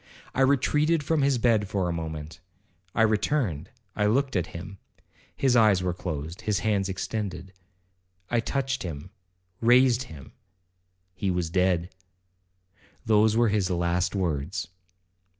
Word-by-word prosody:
I 135 - 0
retreated 150 +4 +2
from 155 +1 +1
his 140 -2 +2
bed 115 -3 +2
for 95 -2 -1
a 85 - -1
moment. 80 -2 -6 0.6
I 110 - +4
returned, 110 - 0 0.3
I 105 - +1
looked 135 +4 +1
at 90 -3 0
him,—his 95 +8 -5
eyes 105 -5 +4
were 90 -1 0
closed,—his 85 +4 -3
hands 100 -3 0
extended. 95 -1 -4 0.7
I 120 - +1
touched 135 +2 -2
him,—raised 95 - 0
him,—he 90 - -10
was 90 -2 -1
dead,—those 90 +4 -2
were 120 -1 +4
his 100 -3 +1
last 90 +1 0
words. 80 -6 -2
95 Hz, 115 wpm, -26 LUFS, 90-115 Hz, 0.7 s, I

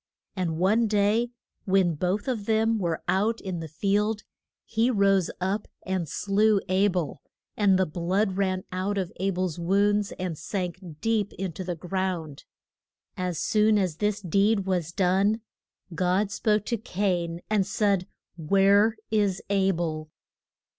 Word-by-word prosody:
And 170 -4 -1
one 215 +6 +3
day 210 +3 +2 0.4
when 190 -3 +3
both 185 - -1
of 225 -6 -2
them 220 0 +2
were 170 -4 -2
out 215 +4 +1
in 185 -3 -4
the 165 - -5
field 205 +6 0 0.4
he 230 +2 +1
rose 195 -5 +3
up 195 +3 -1 0.2
and 185 -4 -2
slew 205 +3 +2
A 190 +2 +3
bel, 180 -5 -2 0.3
and 200 -3 +4
the 190 - +3
blood 185 +5 0
ran 185 -1 0
out 190 +2 -2
of 185 -3 -2
A 195 +2 0
bel's 180 -3 -2
wounds 200 +3 +2
and 180 -3 -4
sank 180 +1 -3 0.2
deep 220 -3 0
in 190 -2 -4
the 180 -2 -4
ground. 175 -4 -3 0.7
As 180 -2 -2
soon 215 +4 +3
as 185 -6 0
this 210 0 0
deed 200 +3 +2
was 180 -4 -1
done, 195 +5 +2 0.5
God 185 +4 +1
spoke 210 -1 +1
to 235 - -1
Cain, 180 -5 -2
and 205 -3 +1
said: 200 -3 +1 0.3
Where 200 +6 +4
is 205 -4 +2
A 195 -1 +3
bel? 160 -4 -2
195 Hz, 145 wpm, -26 LUFS, 180-210 Hz, 0.7 s, and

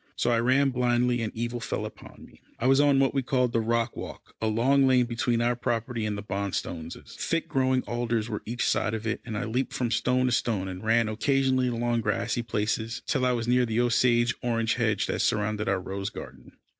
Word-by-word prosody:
So 120 - +1
I 115 - +3
ran 130 +3 +3
blindly, 125 -1 +1
and 110 - -2
evil 120 +1 -3
fell 115 - -3
upon - - -11
me. - - -20 0.2
I - - -3
was 135 +1 +5
on 145 -1 +4
what 135 0 +3
we 135 - +1
called 125 -2 0
the 115 - +2
rock 115 +1 0
walk, - - -9
a 110 - +1
long 130 +5 +3
lane 125 -1 +4
between 120 0 0
our 120 +1 +2
property 115 -2 -2
and 105 -1 -2
the 100 - -6
Bonstones'. 95 -4 -4 0.2
Thick 165 -1 -1
growing 130 -1 +1
alders 120 -2 -1
were 110 -3 -4
each 120 +2 -2
side 110 - +1
of 110 0 -6
it, 115 - -2
and 110 -3 -5
I - - -2
leaped 125 +4 -2
from 120 -2 -1
stone 125 +1 +1
to 125 - +1
stone, 110 -5 0
and 95 +1 -7
ran 115 +1 +3
occasionally 130 +3 +1
along 120 -1 0
grassy 105 +2 -1
places, 110 0 -2
till 135 -4 0
I 125 - +2
was 115 -1 -2
near 125 +1 +3
the 115 -1 0
Osage 120 -1 +3
orange 115 -2 0
hedge 110 -4 0
that - - -2
surrounded 105 -2 0
our 95 -1 +1
rose 95 +2 -4
garden. - - -11
120 Hz, 220 wpm, -27 LUFS, 110-125 Hz, 0.2 s, was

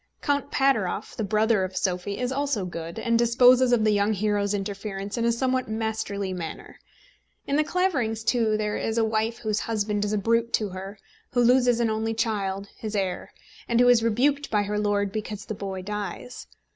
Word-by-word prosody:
Count 285 -1 0
Pateroff, 220 -8 0
the 220 - -2
brother 215 0 +2
of 185 0 -4
Sophie, 185 +2 -1
is 250 0 -2
also 275 -7 -1
good, 170 -1 -6
and 230 0 +1
disposes 245 +2 +5
of 235 -3 +3
the 215 - +4
young 205 +1 +2
hero's 205 0 0
interference 200 0 -4
in 235 -1 0
a 235 - +3
somewhat 255 +1 0
masterly 220 -3 -2
manner. 170 -3 -7 0.7
In 280 - -1
The 305 - +3
Claverings, 280 - 0
too, 225 -2 +2
there 210 -1 -1
is 225 +1 -2
a 225 - +3
wife 220 +1 -1
whose 215 -2 -1
husband 210 -2 -1
is 210 - -1
a 215 - +1
brute 230 +3 +1
to 210 -2 +1
her, 190 +2 -8 0.4
who 245 - +3
loses 245 -1 +4
an 230 -2 +1
only 220 +1 -1
child 200 -3 -1
his 215 -1 -5
heir 190 -3 -2 0.4
and 235 0 +2
who 245 0 +6
is 245 -2 +6
rebuked 270 +6 +1
by 210 -2 +2
her 210 +1 -2
lord 205 -1 0
because 215 0 -5
the - - -4
boy 195 -2 -5
dies. 210 +4 -6
220 Hz, 195 wpm, -25 LUFS, 200-235 Hz, 0.7 s, who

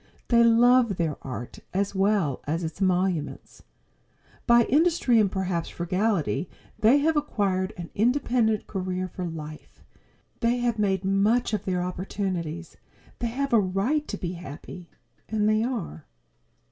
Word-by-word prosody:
They 235 -1 +5
love 235 -1 +5
their 160 -4 -1
art 120 -3 -7 0.2
as 200 +1 0
well 195 -8 +1
as 165 +4 -1
its 160 +4 -6
emoluments. 180 -4 -1 0.9
By 235 -1 +6
industry 295 -3 +3
and 200 -3 +2
perhaps 185 -3 -2
frugality 185 0 -1 0.3
they 230 +6 +5
have 315 +2 +2
acquired 200 -10 0
an 170 -2 -7
independent 235 -2 +1
career 185 -1 -3
for 180 0 -6
life. 155 -2 -9 0.6
They 235 +1 +1
have 240 -2 -1
made 190 -2 0
much 210 +5 +2
of 210 - -2
their 180 -2 0
opportunities. 180 -2 -4 0.4
They 240 - -1
have 275 +3 -2
a 230 - +7
right 205 +11 0
to 205 - -4
be 175 -2 -4
happy. 170 +1 -9 0.4
And 215 -1 +1
they 215 0 +3
are. 220 - -4
195 Hz, 140 wpm, -26 LUFS, 180-235 Hz, 0.9 s, a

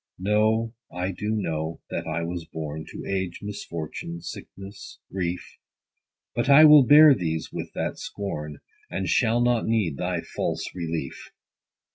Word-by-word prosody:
60 90 - -11
No, 110 +2 +2 0.2
I 90 +2 -2
do 105 +4 -2
know 80 -5 -2
that - - -3
I 85 +1 -2
was 85 0 -4
born 80 -1 -6
To - - -8
age, 95 -3 -3
misfortune, 85 -4 -6
sickness, 100 +3 -9
grief: 90 -1 -4 0.7
But 120 +3 -1
I 145 +3 +9
will 150 -1 +9
bear 150 0 +9
these 80 -8 -3
with - - -5
that - - -3
scorn, 75 -7 -5 0.3
As 95 -2 -2
shall 115 0 +3
not 120 -1 +2
need 105 -11 +1
thy - - -1
false - - -3
relief. 85 -6 -5
95 Hz, 145 wpm, -25 LUFS, 85-110 Hz, 0.7 s, I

